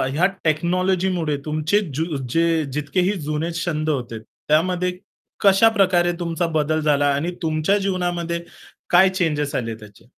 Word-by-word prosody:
या 175 - +3 0.2
टेक्नॉलॉजीमुळे 175 0 0
तुमचे 155 +6 +1
ज्यु 160 0 -2
जे 165 +1 +1
जितकेही 165 +6 0
जुने 155 +2 -2
छंद 155 -2 -1
होते, 120 -6 -3
त्यामध्ये 180 +9 -1 0.4
कशाप्रकारे 195 -3 +4
तुमचा 170 0 -1
बदल 155 +1 +1
झाला 145 -1 +2
आणि 165 +5 -2
तुमच्या 160 +4 +1
जीवनामध्ये 175 -3 -2 0.5
काय 185 +2 +6
चेंजेस 155 -6 -1
आले 115 -2 -2
त्याचे 105 -2 -16
165 Hz, 125 wpm, -21 LUFS, 150-180 Hz, 0.5 s, काय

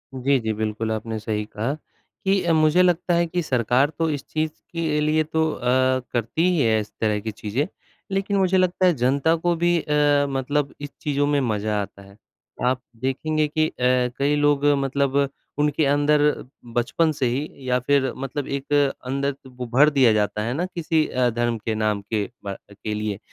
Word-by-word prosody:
जी, 135 +1 +2
जी, 110 -2 -2
बिल्कुल, 110 +1 -2
आपने 110 0 -3
सही 105 0 -2
कहा 110 +5 -3 0.5
कि 195 0 +3
अ, 170 -1 +2
मुझे 155 +2 +4
लगता 180 0 +2
है 170 0 +3
कि 175 +2 -1
सरकार 130 -1 +2
तो 165 -1 +2
इस 145 -3 -3
चीज़ 155 0 -1 0.2
के 160 -3 -1
लिए 155 +1 +2
तो 160 0 0
अ, - - -8 0.5
करती 125 +9 +1
ही 175 -4 +2
है 110 -3 +3
इस 105 - -10
तरह 105 -2 +1
की 110 +1 -4
चीज़ें। 110 +8 -2 0.4
लेकिन 195 +1 0
मुझे 190 -1 +3
लगता 185 0 +2
है 180 - +5
जनता 140 +6 +3
को 170 +1 0
भी 175 +1 +2
अ, 145 -1 +2
मतलब 140 +1 -1
इस 145 - -5
चीज़ों 145 -1 0
में 145 -1 +2
मज़ा 105 -3 -1
आता 100 0 -8
है। 100 +1 -16 0.5
आप 130 0 +1 0.2
देखेंगे 155 +4 0
कि 155 +1 +1
अ, - - -8 0.5
कई 145 +1 +2
लोग 145 -1 +2 0.2
मतलब 140 +1 +1 0.3
उनके 150 +1 +2
अंदर 145 +1 +3 0.5
बचपन 140 +7 +1
से 140 -3 -1
ही 135 +5 -1 0.2
या 125 0 +3
फिर 135 0 +1
मतलब 135 +1 -4
एक 140 +1 -3 0.3
अंदर 140 +2 -1
को 135 -1 -15 0.2
ब - - -11
भर 145 +4 +6
दिया 135 -5 +4
जाता 105 0 0
है 115 +3 -2
ना 170 +6 -1
किसी 165 -4 0
अ, 125 -1 +1
धर्म 120 0 -1
के 110 0 -3
नाम 105 -1 0
के 105 -2 0 0.2
बा 100 -1 -4 0.2
के 105 +1 -5
लिए 105 -1 -2
140 Hz, 195 wpm, -23 LUFS, 115-155 Hz, 0.5 s, भर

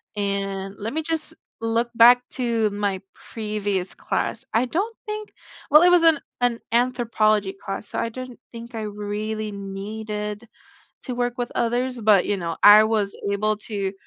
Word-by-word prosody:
and 195 -1 -2
let 215 +3 -4
me 320 - -1
just 325 0 -3 0.3
look 230 +1 0
back 245 +1 +6
to 230 -4 0
my 200 -2 -1
previous 205 -4 -3
class. - - -3
I 225 +3 +3
don't 400 - -2
think 425 0 -5 0.4
well, 300 +3 +7
it 355 - +7
was 355 -1 +6
an 320 -3 +5 0.2
an 245 -1 +1
anthropology 225 -5 +2
class, 195 +1 -6
so - - -4
I 230 - -1
don't 255 +1 -8
think 235 +1 -10
I 225 - -4
really 210 +1 -4
needed 210 +2 -5 0.6
to 255 - -5
work 245 0 -1
with 245 -1 -3
others, 245 +1 0
but, 210 -4 +4
you 205 - 0
know, 170 -3 -4
I 210 +1 +9
was 215 -2 0 0.2
able 215 +1 +1
to 200 -3 -3
220 Hz, 160 wpm, -23 LUFS, 205-245 Hz, 0.6 s, I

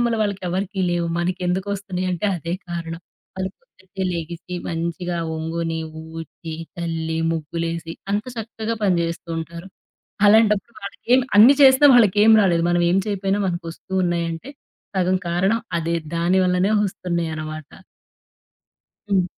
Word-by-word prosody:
నాయనమ్మల 235 -1 +1
వాళ్ళకి 200 -2 -1
ఎవరికీ 190 +2 -2
లేవు, 175 -1 0
మనకెందుకొస్తున్నయి 185 +2 -2
అంటే 180 +3 -1
అదే 170 0 -5 0.2
కారణం. 165 -1 -5 0.4
వాళ్ళు 190 0 -2
పొద్దున్నే 190 +1 -8
లేగిసి 170 +2 -6
మంచిగా 170 +1 -3 0.2
ఒంగుని, 165 0 -2 0.4
ఊడ్చి, 165 0 -8 0.2
చల్లి, 165 -2 -3
ముగ్గులేసి 165 +1 -3 0.2
అంత 210 +1 0
చక్కగా 225 0 -4
పనిచేస్తూ 170 -3 0
ఉంటారు. 170 +3 -7 0.6
అలాంటప్పుడు 215 +1 +4
వాళ్ళకెం 245 +6 +1 0.2
అన్ని 245 +7 +9
చేసినా 265 +2 +8
వాళ్ళకేం 215 -1 +6
రాలేదు. 170 -3 +2
మనం 175 0 +2
ఏం 185 - +3
చేయకపోయినా 200 -1 0
మనకు 175 -1 -3
వస్తున్నాయి 175 -1 -1
అంటే 165 +12 -8 0.5
సగం 185 0 +2
కారణం 190 +6 +1 0.2
అదే, 165 +1 -1 0.2
దాని 175 +3 +2
వల్లనే 180 +3 +2
వస్తున్నాయనమాట. 160 -5 -4 1.4
హ్మ్. 190 -2 +4
180 Hz, 120 wpm, -22 LUFS, 170-200 Hz, 1.4 s, అన్ని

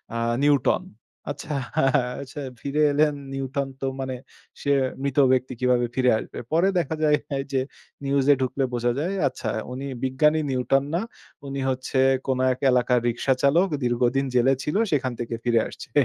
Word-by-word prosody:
আ - - -1 0.3
Newton. 145 -3 +3 0.5
আচ্ছা 145 +1 -6 0.7
আচ্ছা 140 +2 -8 0.2
ফিরে 145 +2 -1
এলেন 150 +1 +3 0.2
নিউটন 135 +1 -2
তো - - -1
মানে 130 -1 -3 0.5
সে 140 - 0 0.3
মৃত 140 0 -2
ব্যক্তি 130 0 +1
কিভাবে 125 -1 +2
ফিরে 125 -1 +3
আসবে? - - -9
পরে 170 +4 +3
দেখা 160 -1 -2
যায় 150 -1 +4
হে 140 - -2 0.2
যে 130 - +2 0.4
নিউজ 135 -1 +1
এ - - +2
ঢুকলে 130 +1 0
বোঝা 120 0 +1
যায় 180 +6 -1
আচ্ছা 130 - -4 0.2
উনি 135 +2 -5 0.2
বিজ্ঞানী 150 +4 +3
নিউটন 135 +1 +1
না, 180 - +1 0.5
উনি 135 0 -4
হচ্ছে 130 +1 -2 0.3
কোন 130 -1 +1 0.2
এক - - -11
এলাকার 125 0 +3
রিকশা 125 +3 +1
চালক 170 +8 +4 0.2
দীর্ঘদিন 125 +3 +1
জেলে 130 +2 +4
ছিল, 150 - -2 0.2
সেখান 135 -3 +1
থেকে 115 -1 -3
ফিরে 120 -2 +3
আসছে। - - -10
135 Hz, 165 wpm, -24 LUFS, 125-145 Hz, 0.7 s, যায়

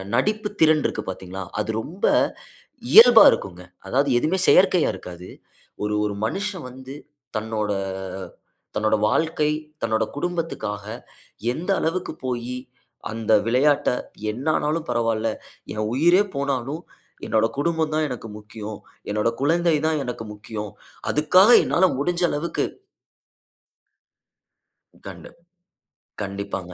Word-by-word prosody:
நடிப்பு 210 - 0
திறன் 155 -2 +5
இருக்கு - - -2
பார்த்தீங்களா, 95 +1 -7 0.2
அது 110 - -5
ரொம்ப 180 - -4 0.9
இயல்பா 230 +2 +10
இருக்குங்க. 90 -2 -4 0.3
அதாவது, 140 +4 +2
எதுவுமே 185 +7 0
செயற்கையா 185 -3 +5
இருக்காது. 90 -1 -10 0.5
ஒரு 105 0 -1
ஒரு 100 -1 -2
மனுஷன் 195 - -4
வந்து 130 +2 -10 0.4
தன்னோட 110 -1 -2 1.0
தன்னோட 110 0 +2
வாழ்க்கை 160 0 +1 0.3
தன்னோட 110 -1 +1
குடும்பத்துக்காக 160 - -3 0.7
எந்த 170 +9 -5
அளவுக்கு 170 0 -2
போயி 125 0 -3 0.6
அந்த 110 -1 -2
விளையாட்ட 140 +5 +3 0.4
என்ன 125 +7 -7
ஆனாலும் 155 +2 -1
பரவால்லை. 115 -1 0 0.4
"என் 105 0 -2
உயிரே 175 +8 +5
போனாலும் 140 +2 -2 0.4
என்னோட 110 0 +2
குடும்பம் 160 +1 0
தான் 155 0 +1
எனக்கு 115 -3 -6
முக்கியம். 105 0 -8 0.3
என்னோட 105 +2 +1
குழந்தை 165 +2 +3
தான் 155 -2 +1
எனக்கு 120 -3 -5
முக்கியம். 105 0 -7 0.4
அதுக்காக 185 +8 +5
என்னால 185 +2 +3
முடிஞ்ச 175 +4 0
அளவுக்கு" 155 +4 -1 2.4
கண்டு - - -9 0.9
கண்டிப்பாங்க. 100 -2 -5
130 Hz, 110 wpm, -23 LUFS, 110-165 Hz, 2.4 s, இயல்பா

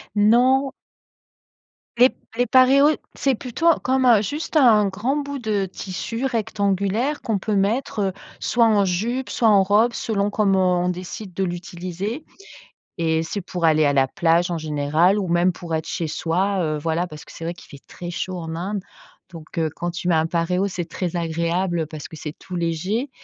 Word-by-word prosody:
Non. 250 +6 +4 1.3
Les 250 +2 +7
p - - -21 0.2
les 245 - +3
paréos, 265 +4 +5 0.2
c'est 270 -2 +1
plutôt 250 +7 -2 0.2
comme, 260 0 +2
heu, 230 -4 +6
juste 300 +8 -4
un 220 -8 +6
grand 220 +9 -1
bout 285 -1 -4
de 210 -4 -1
tissu 195 +6 -5
rectangulaire 215 +2 0
qu'on 215 -4 -1
peut 210 +1 -2
mettre, 210 +3 0
heu, 195 -2 0 0.3
soit 235 -1 +2
en 210 -3 +3
jupe, 230 +9 -1
soit 230 - +1
en 200 -2 +5
robe, 210 +5 +3
selon 205 -2 -1
comment 190 -4 +2
on 180 - +1
décide 185 +2 -6
de 195 - -1
l'utiliser 180 - -5 0.7
et 160 -1 +1
c'est 200 +5 -4
pour 180 -2 -3
aller 155 -1 +4
à 145 - +3
la 135 -1 +3
plage, 170 +3 +1
en 170 - -1
général 155 +5 +2
ou 190 - -2
même 175 +2 +3
pour 170 -1 -7
être 160 - -3
chez 165 - -2
soi. 185 +5 0
Heu, 155 -1 -1
voilà 165 +3 -1
parce 155 -2 -11
que - - -14
c'est 165 - -9
vrai 170 - -2
qu'il - - -15
fait 140 -2 -13
très 175 0 -7
chaud 185 +1 -4
en 165 -1 -5
Inde, 195 +3 -3 0.5
donc 165 -2 -12
heu, 160 -1 +1
quand 175 - -3
tu 175 +1 -5
mets 175 - +3
un 160 +1 +2
paréo, 180 +3 0
c'est 180 -3 -4
très 175 +1 -4
agréable 170 0 -1
parce 155 -2 -8
que 160 - -11
c'est 150 0 -7
tout 185 - -8
léger 180 - -1
190 Hz, 190 wpm, -22 LUFS, 170-220 Hz, 1.3 s, Les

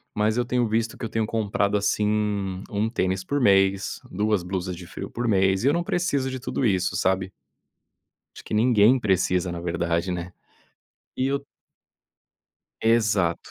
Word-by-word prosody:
mas 110 +2 +1
eu 120 - +1
tenho 120 -2 +1
visto 115 +1 -1
que - - -9
eu 115 - -3
tenho 110 -1 0
comprado, 105 -2 0
assim, 105 -2 0
1 105 +2 -1
tênis 95 -5 -1
por 140 +8 -1
mês, 95 -2 +3
2 105 -1 0
blusas 90 -1 -3
de 90 0 -10
frio - - -7
por 120 0 -3
mês, 95 0 +2
e - - +3
eu 145 - +4
não 170 0 0
preciso 145 -8 0
de 130 0 -5
tudo 130 - -3
isso, 95 -4 +1
sabe? 95 0 0 1.0
Acho - - -12
que - - -5
ninguém 115 +2 +5
precisa, 95 -4 +1
na 85 - -5
verdade, 85 +1 -1
né. 90 0 -4 0.8
E 130 - 0
eu 140 0 -2 1.4
Exato. 105 -7 +1
105 Hz, 165 wpm, -24 LUFS, 95-115 Hz, 1.4 s, ninguém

